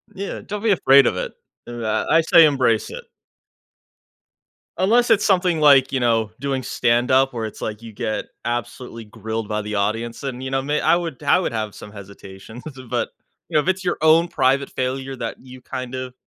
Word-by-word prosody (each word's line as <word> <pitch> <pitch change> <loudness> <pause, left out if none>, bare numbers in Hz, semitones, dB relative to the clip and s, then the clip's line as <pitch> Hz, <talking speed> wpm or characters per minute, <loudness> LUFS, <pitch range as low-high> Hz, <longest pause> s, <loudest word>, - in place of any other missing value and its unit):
Yeah, 200 0 -5
don't 205 +1 -5
be 225 - +3
afraid 140 -7 +5
of - - 0
it. - - -4 0.3
Er, 120 -1 -6 0.2
I 160 - +5
I - - +5
say 165 0 +6
embrace 130 -7 +1
it. - - -8 1.7
Unless 235 +6 +3
it's 220 -2 +3
something 180 -4 +2
like, 140 -3 +5
you 135 - 0
know, 115 -3 +1
doing 135 -1 -2
stand-up 125 +3 +2
where 115 -2 -3
it's, 110 - -9
like, 105 0 -5
you 115 -1 -10
get 110 +1 -3 0.2
absolutely 120 0 -5
grilled 110 0 -5
by 105 0 -1
the 105 0 -5
audience 115 +5 -2
and, 130 -2 -5
you 130 - -5
know, 135 0 0
may 145 +2 -1
I 160 - +3
would 165 -7 -4
I - - +4
would 185 - -2
have 110 -3 -4
some 105 - -11
hesitations, 100 +2 -12 0.3
but - - -1 0.4
you - - -7
know, 150 - +5
if - - -9
it's 190 0 0
your 175 - -1
own 160 +2 +5
private 135 -2 +1
failure 130 +1 -3
that 115 -2 -5
you 130 0 -13
kind 130 0 -6
of 130 -1 -6
130 Hz, 200 wpm, -21 LUFS, 115-150 Hz, 1.7 s, say